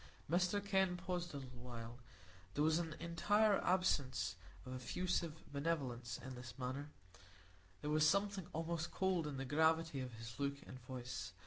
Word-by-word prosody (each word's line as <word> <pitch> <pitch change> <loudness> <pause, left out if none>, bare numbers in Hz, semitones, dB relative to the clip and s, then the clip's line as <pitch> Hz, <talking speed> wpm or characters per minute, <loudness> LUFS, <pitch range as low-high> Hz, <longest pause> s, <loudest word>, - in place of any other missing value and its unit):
Dr 180 +5 +3
Kenn 190 -3 +2
paused 175 -1 -2
a - - -1
little 130 -3 -8
while. 120 -1 -7 0.6
There 145 - +3
was 160 +1 +4
an 165 -2 -2
entire 205 +5 +3
absence 140 - +2 0.3
of 130 - -5
effusive 165 +4 -1
benevolence 130 -7 -1
in 130 +1 -7
his 120 -2 -8
manner; 135 +3 -3 0.9
there 150 - -1
was 155 0 +6
something 200 -2 +1
almost 165 +1 -1
cold 185 -4 +1
in 145 -2 -3
the 135 - -2
gravity 160 +1 +3
of 130 -2 -4
his 115 +3 -8
look 140 0 +1
and 130 - -8
voice. 125 0 -5
150 Hz, 155 wpm, -40 LUFS, 130-175 Hz, 0.9 s, was